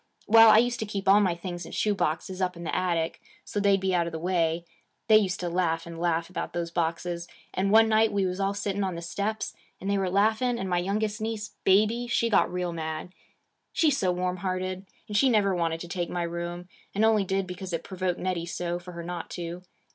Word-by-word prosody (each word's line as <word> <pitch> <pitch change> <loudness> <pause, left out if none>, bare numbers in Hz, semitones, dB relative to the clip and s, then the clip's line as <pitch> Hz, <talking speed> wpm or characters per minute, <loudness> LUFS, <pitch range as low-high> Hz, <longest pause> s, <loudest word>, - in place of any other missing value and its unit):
Well, 225 +1 +8
I 215 - +8
used 240 +1 +2
to 220 - -3
keep 200 -1 -4
all 195 +2 +7
my 185 -4 +2
things 175 0 -6
in - - -10
shoe 210 - +1
boxes, 185 +1 -2
up 180 -1 -1
in 170 - -8
the 170 - -2
attic, 170 -3 -1 0.2
so 205 - -3
they'd 200 -1 +4
be 190 0 0
out 170 -1 +2
of - - -4
the 165 - -4
way. 170 -1 0 0.4
They 215 -1 +8
used 195 -3 0
to 175 - -2
laugh, 170 -2 0
and 170 -1 -8
laugh, 170 -1 0
about 185 - -5
those 170 -1 -3
boxes; 170 +1 -2 0.3
and 190 +1 0
one 225 +2 +6
night 220 0 +3
we 200 -1 +1
was 185 +1 -2
all 195 0 0
sitting 200 0 -1
on 185 -2 -2
the 170 - -6
steps, 205 +5 -3 0.3
and 195 - -6
they 200 0 +1
were 190 -1 0
laughing, 220 +5 +2
and 190 - -3
my 175 -1 +1
youngest 210 +4 -1
niece, 215 -1 -3
Baby, 215 +5 +3
she 230 0 +1
got 200 - +3
real 180 -1 -2
mad. 160 +2 -5 0.6
She 315 -2 +3
's 275 - 0
so 185 -2 +2
warm 180 0 -1
hearted 185 +1 -3 0.2
and 210 - -5
she 265 +5 +5
never 205 -4 +3
wanted 165 -2 0
to 175 - -6
take 175 -1 -3
my 175 -1 -2
room, 170 +1 -4 0.3
and 215 +2 +3
only 220 -2 +4
did 195 0 -1
because 180 0 -7
it 165 -1 -2
provoked 185 -2 -2
Nettie 180 -2 -2
so, 175 +1 -3
for 180 0 -10
her 170 0 -6
not 175 -1 -5
to. 175 +1 -6
185 Hz, 240 wpm, -27 LUFS, 175-205 Hz, 0.6 s, Well